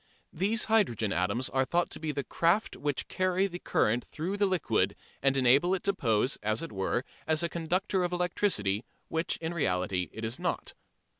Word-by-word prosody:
These 205 +6 +1
hydrogen 120 - +2
atoms 95 +9 0
are 130 0 +2
thought 175 +6 0
to - - -1
be 155 -1 -2
the 140 -1 -3
craft 170 +10 +1
which 145 -2 -2
carry 185 +1 +1
the 175 -2 -4
current 120 -6 +1
through 170 +6 -4
the 205 0 +2
liquid 185 -3 +1 0.3
and 135 0 +3
enable 135 +8 +4
it 185 - -5
to 200 - +2
pose, 120 - +1
as 110 +6 -1
it 165 - -6
were, 100 +5 -1 0.2
as 160 +1 +3
a 170 - 0
conductor 180 +3 0
of 175 - -1
electricity, 175 - 0 0.3
which 160 +1 -1
in 165 +1 -4
reality 90 - 0
it 110 +1 -5
is 115 +2 -4
not. - - -2
160 Hz, 190 wpm, -30 LUFS, 115-180 Hz, 0.3 s, enable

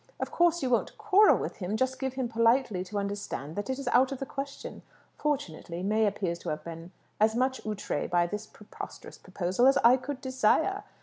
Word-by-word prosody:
Of - - -3
course, 345 -2 +2
you 260 - 0
won't 235 - 0
quarrel 430 -1 +5
with - - -5
him. 200 +2 -2
Just 260 +2 -1
give 265 -1 -3
him 260 -2 -1
politely 230 -3 +2
to 205 +2 -5
understand 200 -7 -4
that 205 +5 -4
it 260 - -1
is 275 - -7
out 255 +3 +4
of 275 - -3
the 270 - -4
question. 275 +1 -6 0.3
Fortunately, 180 - -3
May 215 +2 +2
appears 185 -4 -2
to 170 - -5
have 150 0 -3
been 165 +1 -8 0.3
as 220 +1 +3
much 260 +2 0
outrée 210 -8 -3
by 175 -1 +3
this 210 +4 -5
preposterous 210 - -10
proposal 185 +7 +1
as 270 - +5
I 240 +3 +7
could 265 +1 -6
desire. 265 - +1
230 Hz, 200 wpm, -29 LUFS, 190-265 Hz, 0.3 s, I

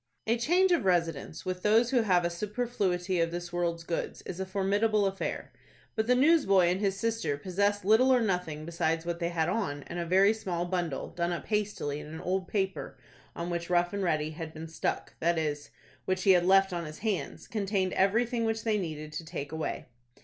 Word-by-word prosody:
A 225 - +2
change 355 +10 +3
of 345 - +3
residence 165 -4 0
with 185 0 -3
those 225 +4 +4
who 250 -3 +4
have 180 -5 +3
a 170 - 0
superfluity 190 -3 -1
of 165 - +1
this 175 0 -6
world's 170 -1 -1
goods 165 0 -4
is 185 - -7
a 190 - -3
formidable 205 +2 +1
affair. 195 0 -3 0.4
But 220 0 0
the 250 - +5
newsboy 250 - +5
and 185 - -1
his 195 -1 0
sister 225 -11 -1
possessed 200 +4 0
little 225 +6 +5
or 255 - +5
nothing 180 -8 -1
besides 165 0 -1
what 170 0 -3
they 170 -1 -1
had 165 -2 0
on, 180 -8 -2
and 175 - -6
a 170 - -2
very 195 +4 +5
small 185 -6 -3
bundle, 175 -5 -2
done 170 0 -1
up 175 - -4
hastily 205 -9 -1
in - - -9
an 160 +1 -7
old 185 0 -1
paper 195 -2 -2 0.4
on 170 +1 -4
which 170 0 -3
Rough 175 +1 +2
and 200 - -2
Ready 155 -4 0
had 160 0 -7
been 160 +1 -6
"stuck," 160 - -3
that 170 +1 +2
is, 150 -2 -2 0.4
which 185 0 -1
he 195 - +6
had 180 -1 +4
left 195 0 +5
on 170 -1 -3
his 155 0 -8
hands, 210 -4 -2
contained 195 -3 -1
everything 230 +5 +2
which 225 -1 -1
they 215 -2 +1
needed 155 -4 -5
to 155 - -4
take 155 -3 -6
away. 160 0 -3
185 Hz, 210 wpm, -29 LUFS, 170-210 Hz, 0.4 s, he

